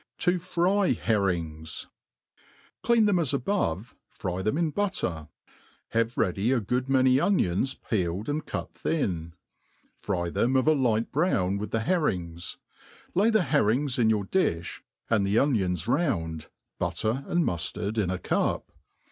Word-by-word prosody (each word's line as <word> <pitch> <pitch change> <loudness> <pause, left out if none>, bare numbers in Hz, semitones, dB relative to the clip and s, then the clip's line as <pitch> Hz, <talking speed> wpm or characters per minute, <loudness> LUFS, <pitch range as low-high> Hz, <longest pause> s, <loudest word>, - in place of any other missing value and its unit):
To 180 0 +2
fry 180 +1 +2
Herrings* 85 -9 -1 1.0
CLEAN 235 -2 +4
them 200 -4 +3
as 145 -4 +2
above, 125 - -1
fry 90 -1 -4
them 110 +9 0
in 165 -2 +1
butter; 115 - -2 0.6
have 115 +1 0
ready 100 +6 +1
a 135 - +3
|;ood.raaoy 130 +4 +2
onions 130 - +1
peeled 95 -1 -2
and 150 +1 -1
cut - - -5
thin; 85 - -2 0.6
fry 85 -4 -2
them 125 +9 +1
of 130 +3 +2
a 155 - +6
light 115 -6 +1
brown 100 - +1
with 105 0 -4
the 115 +1 -1
herrings; 90 - -1 0.6
lay 205 +5 +4
the 220 -4 +3
herrings 135 -2 +1
in 110 -2 +4
your 105 -3 +1
di(b, 90 - -1 0.3
and 110 -4 +2
the 100 +2 +1
onions 95 - +1
round, 80 - 0 0.3
butter 115 +6 -1
and 175 -1 +1
muftard 100 +5 -2
in 95 -4 +1
a 95 - -1
cup. - - -1
115 Hz, 140 wpm, -27 LUFS, 95-150 Hz, 1.0 s, a